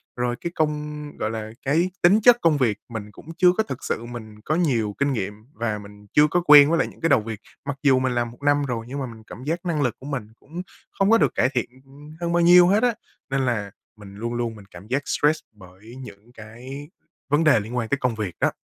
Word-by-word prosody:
rồi 120 0 -1
cái 170 - -3
công 150 -1 -2 0.2
gọi 110 - -2
là, 110 -1 -5
cái 170 +6 +2
tính 200 +5 +5
chất 240 +1 +7
công 160 -3 +3
việc 115 -6 +1
mình 105 -2 -7
cũng 160 +8 -12
chưa 180 -1 +6
có 220 - +3
thực 135 - -7
sự 120 - -3
mình 110 -3 -9
có 155 +8 -1
nhiều 120 - 0
kinh 140 -1 +1
nghiệm, 105 -3 -3 0.2
và 110 -2 -2
mình 105 0 -14
chưa 150 0 +6
có 175 - +2
quen 145 0 +9
với 165 - +2
lại - - +1
những - - -15
cái 165 - +1
đầu 130 -6 +4
việc. 110 -1 -6 0.3
Mặc 140 -1 -4
dù 130 -2 +5
mình 130 -1 0
làm 120 -1 -1
1 120 - -18
năm 145 0 +3
rồi 115 -3 -4
nhưng 140 +1 -4
mà 135 - -2
mình 110 -2 -11
cảm 125 - -10
giác 170 +4 -3
năng 160 -4 0
lực 125 -4 0
của 135 - -12
mình 125 -8 -4
cũng 170 +5 -8 0.4
không 195 +1 +3
có 230 - +7
được - - +1
cải 125 - +3
thiện, 125 -2 -1 0.2
ừm, 145 +3 -14
hơn 170 0 -1
bao 175 - +3
nhiêu 175 +1 +7
hết 205 +5 +3
á, 245 -2 +3 0.4
nên 135 0 0
là 105 -5 -2 0.3
mình 100 -1 -12
luôn 115 +3 -4
luôn 120 -2 -2
mình 100 -2 -13
cảm 90 +4 -12
giác 135 +4 0
stress 150 +2 +2
bởi 105 +3 -15
những 115 -1 -12
cái 125 +7 -10 0.4
vấn 145 +3 +3
đề 140 -8 +5
liên 110 +4 -6
quan 115 -2 -2
tới 140 - +1
công 125 -4 -1
việc 100 -6 -4
đó. - - +2
130 Hz, 255 wpm, -23 LUFS, 110-150 Hz, 0.4 s, quen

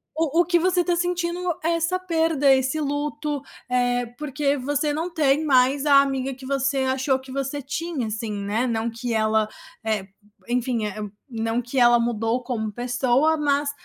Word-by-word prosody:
o 325 +1 +2
o - - +1
que 345 0 +3
você 360 +1 +2
tá 350 0 +1
sentindo 350 0 -1 0.2
é 330 - +2
essa 335 +2 0
perda, 325 -6 +2
esse 265 +3 +1
luto, 295 0 -2 0.3
eh, 245 -1 +1
porque 290 -1 0
você 290 +3 0
não 325 +4 -2
tem 300 -1 +2
mais 270 0 +3
a 280 -1 +7
amiga 270 -1 -1
que 260 +1 -12
você 275 0 0 0.2
achou 265 0 +1
que 260 0 -12
você 275 +1 -3
tinha, 285 -2 -3
assim, 220 0 -4
né, 205 +5 -1
não 230 0 -1
que 235 +1 -4
ela 220 -1 +2 0.3
é 215 -3 -1 0.4
enfim, 245 -2 0
eh, 210 0 -5 0.3
não 225 0 -1
que 250 +2 -2
ela 240 0 +6
mudou 230 +1 0
como 220 -4 -3
pessoa, 250 +6 +1
mas 285 -1 +1
270 Hz, 175 wpm, -24 LUFS, 240-300 Hz, 0.4 s, a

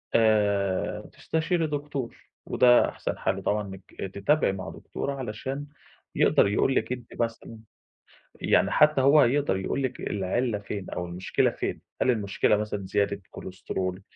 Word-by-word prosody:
آآ 100 -4 +2
تستشيري 160 +1 -1
دكتور 145 -4 -4 0.3
وده 120 -1 +5
أحسن - - -4
حَل - - -1
طبعًا 105 +1 +1
إنِّك 95 0 -8
تتابعي 145 +6 +2
مع 95 -1 -6
دكتورة 140 - -5
علشان 130 +3 -5 0.5
يقدر - - +4
يقول 120 +6 +2
لِك - - 0
أنتِ 125 -1 -5
مثلًا 115 -1 -4 0.8
يعني - - +3
حتى 150 -2 +4
هو 140 +3 +6
هيقدر 140 -4 +2
يقول 95 +8 -2
لِك 130 -1 -3
العِلّة 105 +4 -1
فين 100 -1 -6
أو 90 - -4
المشكلة 90 +2 0
فين؟ - - -4 0.2
هل - - +4
المشكلة 105 -2 +1
مثلًا 105 -2 -3
زيادة 100 +1 0
كولسترول؟ 95 0 -5
110 Hz, 140 wpm, -27 LUFS, 100-135 Hz, 0.8 s, هو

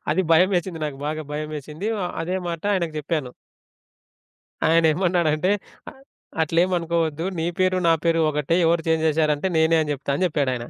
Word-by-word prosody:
అది 190 - +1
భయమేసింది 180 0 +2
నాకు 135 -2 -7
బాగా 155 +1 -3
భయమేసింది 155 +5 -5
ఆ! - - -1 0.2
అదే 180 +3 -2
మాట 170 -1 -4
ఆయనకు 170 -4 -1
జెప్పాను. 150 -4 -3 1.4
ఆయనేమన్నాడంటే, 165 +1 +2 0.4
అ - - -13 0.5
"అట్లేమనుకోవద్దు, 165 -1 0
నీ 160 - -1
పేరు, 185 0 +2
నా 165 - +6
పేరు 165 0 +3
ఒకటే. 150 +3 0
ఎవరు 165 0 +2
చేంజ్ 160 0 +2
జేసారంటే, 155 +2 +1
నేనే 160 +1 +4
అని 150 - -3
చెప్తాను." 140 0 -3
అని 185 - +1
జెప్పాడాయన. 130 -6 -1
160 Hz, 145 wpm, -23 LUFS, 150-170 Hz, 1.4 s, నా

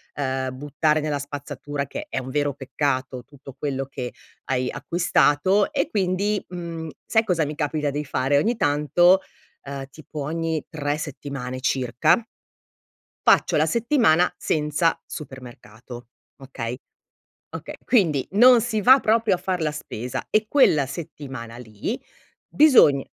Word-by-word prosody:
uhm, 130 -2 -2
buttare 150 +2 0
nella 150 -1 -2
spazzatura, 145 0 -5
che 300 +2 -6
è - - -2
un 130 0 -7
vero 145 0 0
peccato, 130 -2 -2
tutto 135 0 -13
quello 135 -2 -2
che 125 -2 -6 0.3
hai 130 -1 -1
acquistato 170 - +2
e 280 - 0
quindi, 200 +1 0
mhmm, 170 -2 -6 0.2
sai 220 0 +2
cosa 175 -6 +1
mi 150 +1 -5
capita 150 -1 -1
di 150 +1 -3
fare? 135 +1 +1
Ogni 230 +11 +1
tanto, 160 +5 +4 0.5
uhm, 140 -1 -6
tipo 155 +1 -9
ogni 160 0 -2
3 145 -1 -2
settimane 140 -4 -6
circa 130 - +2 1.0
faccio - - +4
la - - +3
settimana 230 - +3
senza 150 +1 0
supermercato, 120 -3 -10 0.3
okay? 125 -3 -6 0.8
Okay, - - -7
quindi 165 - +2
non 240 +3 +7
si 220 -2 -1
va 260 +6 +7
proprio 220 -2 +2
a - - -3
far 185 -1 -2
la 155 -1 0
spesa 125 -5 -6
e 215 0 +2
quella 160 - +4
settimana 135 -6 -8
lì 115 - -5 0.5
bisogn 255 - +5
145 Hz, 135 wpm, -23 LUFS, 135-180 Hz, 1.0 s, non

